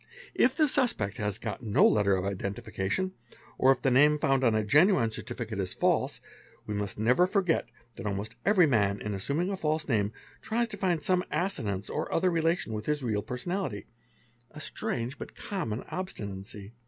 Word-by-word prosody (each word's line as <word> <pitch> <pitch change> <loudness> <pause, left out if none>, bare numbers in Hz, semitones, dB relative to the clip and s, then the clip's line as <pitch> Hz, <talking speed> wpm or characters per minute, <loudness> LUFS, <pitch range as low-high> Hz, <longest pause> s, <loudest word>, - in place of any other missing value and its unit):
If 260 +2 +3
the 310 0 +4
suspect 225 - +1
has 105 -3 -2
got 110 -2 -5
no 110 -4 +4
letter 100 -2 +3
of 95 0 -2
identification, 100 - -2 0.5
or 130 - +6
if 130 - 0
the 135 - +3
name 150 +4 +5
(4 140 - 0
i 135 - +5
nd 135 - -3
on 115 -3 +4
a 110 - +2
genuine 145 - +4
certificate 110 -1 -5
is 90 -2 -2
false, - - +1 0.5
we 105 - -4
must 100 -2 -3
never 125 +12 +4
forget 190 -3 +1 0.3
that - - -4
almost 105 +3 -3
ary 195 -4 +5
man 105 -7 +2
in 105 +1 -4
assuming 145 - -1
a 195 - -2
false 155 -2 -1
name 105 -6 +1 0.3
tries 235 +2 0
to 205 - -6
find 175 -6 0
some 180 +1 +2
assonance 105 - -2
or - - -3
other 180 +2 +2
lation 165 -2 +1
with 110 -1 -5
his 150 -2 0
real 105 -4 0
personality,—a 120 - -7
strange 125 -3 -4
but - - -8
common 140 - -4
obstinacy. 105 - -6
120 Hz, 180 wpm, -29 LUFS, 105-170 Hz, 0.5 s, or